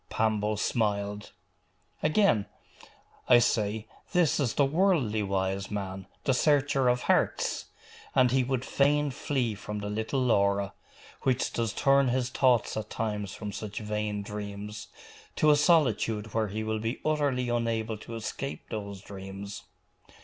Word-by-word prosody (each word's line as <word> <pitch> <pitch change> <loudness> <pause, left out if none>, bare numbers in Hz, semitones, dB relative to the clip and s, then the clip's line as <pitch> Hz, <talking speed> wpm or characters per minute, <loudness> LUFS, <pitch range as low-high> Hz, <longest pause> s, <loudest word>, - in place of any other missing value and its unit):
Pambo 110 -1 +1
smiled. 105 -1 -1 0.7
'Again, 155 - +3 0.8
I 125 - +9
say, 110 -2 +1 0.3
this 175 -5 +3
is 130 -6 0
the 140 - +4
worldly 145 - +2
wise 95 0 -1
man, 95 -2 -5 0.2
the 135 - +2
searcher 140 -1 +3
of 125 0 +1
hearts! - - +1 0.5
And 130 -2 +5
he 130 0 +3
would 130 0 -1
fain 145 +1 +2
flee 130 -4 -1
from 105 +1 -6
the 105 0 -4
little 110 +6 -1
Laura, 100 -4 +2 0.5
which 130 -1 0
does 115 -2 0
turn 140 +3 +3
his 125 0 0
thoughts 125 -4 +2
at 110 -1 -4
times 105 -3 -3
from 105 -2 -5
such 105 0 -6
vain 105 -1 -2
dreams, 105 0 -6 0.5
to 155 - +4
a - - +6
solitude 115 - +2
where 110 -1 +1
he 110 +2 -4
will 110 0 -1
be 115 +3 -3
utterly 140 -5 +1
unable 115 -2 -1
to 115 - -8
escape 115 +5 -5
those 100 -3 -5
dreams. 100 +1 -8
110 Hz, 140 wpm, -29 LUFS, 105-130 Hz, 0.8 s, I